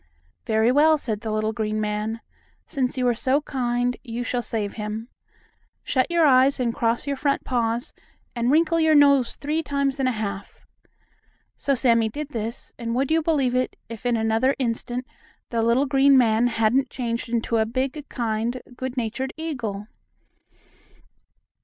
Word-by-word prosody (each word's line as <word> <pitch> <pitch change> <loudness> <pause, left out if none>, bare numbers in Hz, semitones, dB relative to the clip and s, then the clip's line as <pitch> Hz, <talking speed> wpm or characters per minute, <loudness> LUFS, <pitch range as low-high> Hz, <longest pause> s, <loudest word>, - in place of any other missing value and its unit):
"Very 220 +1 +3
well," 310 +3 +5
said 220 -7 -3
the 220 - -4
little 215 +1 -1
green 215 -1 -2
man, 215 +2 -2 0.4
"since 260 -3 -2
you 250 -1 +1
are 240 - +3
so 260 +4 +2
kind, 245 -3 -1
you 240 -2 -4
shall 245 0 -1
save 215 -3 -3
him. 215 +2 -5 0.7
Shut 255 -2 0
your 340 -2 +3
eyes, 265 0 +5
cross 235 -2 0
your 280 -1 -1
front 280 0 0
paws, 235 -1 -1 0.4
and 235 0 0
wrinkle 330 +3 +3
your 315 -1 +4
nose 280 -4 +5
three 300 +3 -2
times 280 -2 -1
and 260 -1 +2
a - - -1
half." 200 -2 -6 0.9
So 275 - 0
Sammie 230 -3 +3
did 295 +5 -6
this, 230 -3 -4
and, 230 0 -3
would 270 +3 0
you 325 0 +3
believe 290 -6 +1
me? 255 0 +2 0.2
if, 230 -2 -8
in 240 -1 +2
another 225 +4 +1
instant, 245 0 -2 0.5
the 230 -1 0
little 235 +5 +3
green 275 0 +5
man 230 -1 +4
hadn't 240 +3 +1
changed 235 -2 -3
into 230 0 0
a 220 - +2
big, 265 +5 -3
kind, 230 +1 -2 0.2
good 260 +1 -5
natured 245 +3 -3
eagle. 240 -11 -4
245 Hz, 160 wpm, -24 LUFS, 225-275 Hz, 0.9 s, well